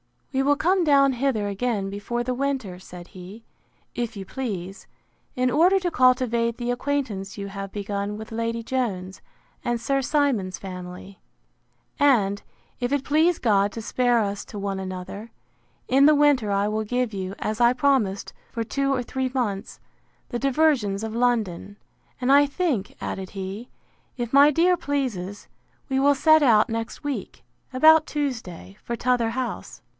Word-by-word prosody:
We 265 Hz, -, +2 dB
will 285 Hz, +1 st, +3 dB
come 360 Hz, +5 st, +2 dB
down 275 Hz, -3 st, +4 dB
hither 245 Hz, -5 st, 0 dB
again 200 Hz, -1 st, -2 dB
before 205 Hz, +4 st, -3 dB
the 250 Hz, +1 st, -2 dB
winter, 255 Hz, -9 st, -2 dB
said 180 Hz, -1 st, -11 dB
he, 195 Hz, +4 st, -11 dB, 0.5 s
if 235 Hz, -1 st, -3 dB
you 195 Hz, -1 st, -7 dB
please, 195 Hz, -6 st, -5 dB, 0.5 s
in 250 Hz, 0 st, +1 dB
order 355 Hz, +7 st, +4 dB
to 360 Hz, -2 st, -2 dB
cultivate 250 Hz, -3 st, +2 dB
the 245 Hz, 0 st, -2 dB
acquaintance 245 Hz, -7 st, -3 dB
you 200 Hz, -1 st, -5 dB
have 195 Hz, 0 st, -6 dB
begun 205 Hz, 0 st, -3 dB
with 220 Hz, +1 st, -9 dB
Lady 230 Hz, 0 st, -2 dB
Jones, 205 Hz, -7 st, -3 dB, 0.4 s
and 240 Hz, -1 st, -1 dB
Sir 275 Hz, +4 st, 0 dB
Simon's 265 Hz, -10 st, 0 dB
family; 180 Hz, 0 st, -9 dB, 0.8 s
and, 210 Hz, -8 st, +3 dB, 0.4 s
if 245 Hz, +1 st, -2 dB
it 285 Hz, -2 st, 0 dB
please 315 Hz, +5 st, +2 dB
God 205 Hz, -3 st, +2 dB
to 225 Hz, -, -5 dB
spare 245 Hz, +1 st, +1 dB
us 200 Hz, -2 st, -2 dB
to 210 Hz, -, -9 dB
one 195 Hz, -1 st, -3 dB
another, 190 Hz, +4 st, -7 dB, 0.6 s
in 270 Hz, +2 st, +5 dB
the 305 Hz, -, +6 dB
winter 285 Hz, -7 st, +3 dB
I 200 Hz, 0 st, +1 dB
will 215 Hz, +1 st, -2 dB
give 245 Hz, 0 st, -1 dB
you, 190 Hz, 0 st, -4 dB
as 215 Hz, +1 st, -3 dB
I 240 Hz, 0 st, +5 dB
promised 250 Hz, -8 st, +1 dB, 0.2 s
for 230 Hz, -, -2 dB
two 275 Hz, +4 st, -1 dB
or 255 Hz, -2 st, -1 dB
three 260 Hz, +2 st, -2 dB
months, 205 Hz, -6 st, -2 dB, 0.5 s
the 240 Hz, -, -3 dB
diversions 265 Hz, -8 st, +1 dB
of 220 Hz, -1 st, -4 dB
London. 225 Hz, -6 st, 0 dB, 0.5 s
And 250 Hz, +2 st, +2 dB
I 285 Hz, +1 st, +7 dB
think, 280 Hz, -, -2 dB
added 190 Hz, -1 st, -5 dB
he, 195 Hz, +5 st, -6 dB, 0.5 s
if 240 Hz, -1 st, -4 dB
my 280 Hz, +1 st, +8 dB
dear 345 Hz, +4 st, +3 dB
pleases, 250 Hz, -, -3 dB, 0.4 s
we 265 Hz, 0 st, +1 dB
will 285 Hz, +1 st, +4 dB
set 315 Hz, +2 st, +5 dB
out 225 Hz, -6 st, +4 dB
next 225 Hz, +4 st, -4 dB
week, 290 Hz, -2 st, -5 dB, 0.3 s
about 315 Hz, +4 st, +6 dB
Tuesday, 225 Hz, -, -4 dB
for 235 Hz, -, -4 dB
t'other 245 Hz, -1 st, +1 dB
house. 255 Hz, +1 st, -5 dB
235 Hz, 160 wpm, -24 LUFS, 200-275 Hz, 0.8 s, my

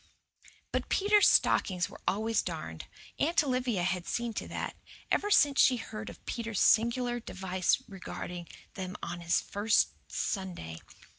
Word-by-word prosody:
But -, -, -2 dB
Peter's 415 Hz, +1 st, +5 dB
stockings 180 Hz, -2 st, +3 dB
were -, -, -13 dB
always 220 Hz, +3 st, +1 dB
darned. -, -, -6 dB, 0.3 s
Aunt 325 Hz, +2 st, +3 dB
Olivia 250 Hz, -8 st, 0 dB
had 180 Hz, -1 st, -1 dB
seen 235 Hz, -1 st, -2 dB
to -, -, -4 dB
that, -, -, -4 dB, 0.4 s
ever 415 Hz, -, +2 dB
since 290 Hz, -8 st, +5 dB
she 255 Hz, -, +5 dB
heard 220 Hz, -1 st, -6 dB
of -, -, -13 dB
Peter's 230 Hz, -4 st, -3 dB
singular 240 Hz, +2 st, +3 dB
device 185 Hz, -4 st, -1 dB
regarding 180 Hz, -2 st, -7 dB, 0.3 s
them 185 Hz, 0 st, -5 dB
on 175 Hz, 0 st, -4 dB
his 170 Hz, +1 st, +2 dB
first 210 Hz, +2 st, +2 dB, 0.2 s
Sunday. 175 Hz, -, -4 dB
215 Hz, 140 wpm, -30 LUFS, 180-245 Hz, 0.4 s, Peter's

